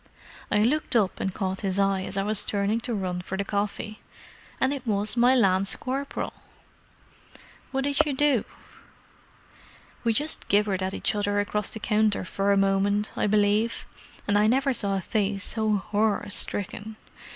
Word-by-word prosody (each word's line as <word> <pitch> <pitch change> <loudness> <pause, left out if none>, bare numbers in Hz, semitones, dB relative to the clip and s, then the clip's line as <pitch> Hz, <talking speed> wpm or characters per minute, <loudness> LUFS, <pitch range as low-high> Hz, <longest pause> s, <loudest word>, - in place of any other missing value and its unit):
I 210 - +3
looked 280 +3 0
up 205 -5 +2
and 190 - -1
caught 190 0 -3
his 195 -1 0
eye 195 -1 +2
as 190 +1 -5
I 195 - +1
was 210 0 +3
turning 205 +2 0
to 235 +1 -4
run 180 -3 -3
for 190 +1 -5
the 200 - -1
coffee—and 210 +6 -4
it 265 -3 -7
was 205 +1 +2
my 245 +2 +5
lance 195 -4 +3
corporal!" 275 +2 -4 1.4
"What 270 0 -2
did 280 0 +2
you 295 - -2
do?" 275 -4 +2 1.6
"We 230 - +2
just 295 +7 0
gibbered 200 -2 +2
at 190 +1 -2
each - - +1
other 205 -1 0
across 205 0 -1
the 220 - -5
counter 215 -3 +1
for 200 +2 0
a 200 - +3
moment, 195 +2 +1
I - - 0
believe—and 205 0 0
I 210 - +4
never 265 +3 +2
saw 200 -4 +1
a - - -3
face 200 +1 -1
so 220 -1 0
horror 205 +1 0
stricken! 205 +2 -1
205 Hz, 165 wpm, -26 LUFS, 195-230 Hz, 1.6 s, my